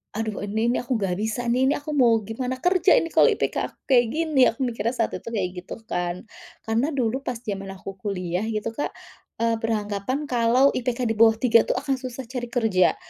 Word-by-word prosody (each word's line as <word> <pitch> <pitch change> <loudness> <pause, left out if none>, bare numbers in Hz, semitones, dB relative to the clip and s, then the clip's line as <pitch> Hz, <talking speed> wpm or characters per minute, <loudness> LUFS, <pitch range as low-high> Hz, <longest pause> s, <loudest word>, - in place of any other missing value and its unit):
"Aduh 220 -2 -3
ini 220 +2 -1
nih - - 0
aku 255 - -10
enggak 190 -4 -1
bisa 220 +3 -2
nih, 250 +2 +2
ini 285 - +3
aku 300 +1 -6
mau 245 -5 +5
gimana 250 +4 -3
kerja 360 +4 +3
ini 330 - +1
kalau - - +6
IPK - - -2
aku - - -23
kayak 245 -2 +6
gini?!" 315 -4 0
Aku 225 - -8
mikirnya 230 -1 -1
saat 225 - 0
itu - - -7
kayak 200 -6 -1
gitu 180 - -8 0.2
kan. 175 0 -2 0.4
Karena 225 +5 +1
dulu 250 0 0
pas 250 -3 -3
zaman 195 -2 -4
aku 195 0 -9
kuliah 180 -3 -2
gitu 225 0 -2
Kak, 290 - -2 0.5
eee, 230 0 +2
beranggapan 215 +4 -2
kalau 245 +1 +3
IPK 250 0 -2
di - - +1
bawah 225 -1 +7
3 230 -1 +5
itu - - +2
akan 275 +1 -1
susah 255 0 -6
cari 245 0 -5
kerja. 220 -7 +2
230 Hz, 205 wpm, -24 LUFS, 210-255 Hz, 0.5 s, bawah